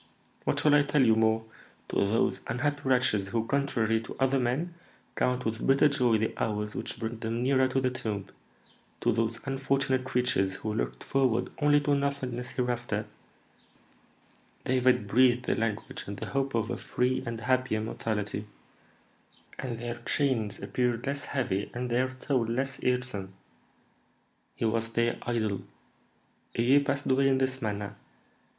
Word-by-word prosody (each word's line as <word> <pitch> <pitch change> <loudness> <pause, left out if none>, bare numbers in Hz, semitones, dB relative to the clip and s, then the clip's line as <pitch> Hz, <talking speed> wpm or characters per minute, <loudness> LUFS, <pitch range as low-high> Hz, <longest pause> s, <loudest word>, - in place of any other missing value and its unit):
What - - +1
shall 150 - +4
I 145 - +7
tell 145 -1 +3
you 110 -1 +5
more? 110 0 +2 0.4
To - - -2
those 100 -1 +2
unhappy 145 +5 -1
wretches 125 -6 +2
who, 115 0 0
contrary 115 -5 +1
to 115 - -8
other 135 0 +3
men, 130 +8 -1 0.4
count 125 0 0
with 110 +1 -2
bitter 135 +2 +5
joy 125 -5 +3
the 110 +1 -1
hours 105 -1 -2
which - - -5
bring 115 0 -4
them 115 +1 -2
nearer 130 0 +4
to 130 +1 0
the 130 -1 +1
tomb, 105 -6 -3 0.8
to 120 - +3
those 115 0 0
unfortunate 135 -1 +1
creatures, 125 -7 +1
who 110 +1 -3
looked 110 - -3
forward 130 -4 +1
only 145 -1 +5
to 145 0 +1
nothingness 135 -3 -1
hereafter, 120 -4 -2 1.6
David 130 -3 +3
breathed 125 +3 +4
the - - +1
language 110 -2 -3
and 100 0 -5
the - - -5
hope 135 -2 0
of 115 -1 0
a - - -2
free 125 +1 0
and 115 -1 -5
happy 130 -1 +1
immortality; 105 -1 -3 1.1
and 120 -3 -3
then 120 +1 -5
their - - -7
chains 115 -8 0
appeared 120 -1 0
less 140 0 -1
heavy 105 -7 -1
and 125 0 -3
their 130 +2 +2
toil 130 -1 -1
less 135 +4 -1
irksome. 125 -7 -1 1.2
He - - -2
was 115 0 0
their 115 +1 0
idol. 110 -5 -1 0.9
A 115 - +2
year 135 +4 +6
passed 140 0 -1
away 135 +1 +3
in 135 -1 +3
this 130 0 0
manner. 105 -1 -3
125 Hz, 155 wpm, -29 LUFS, 110-130 Hz, 1.6 s, I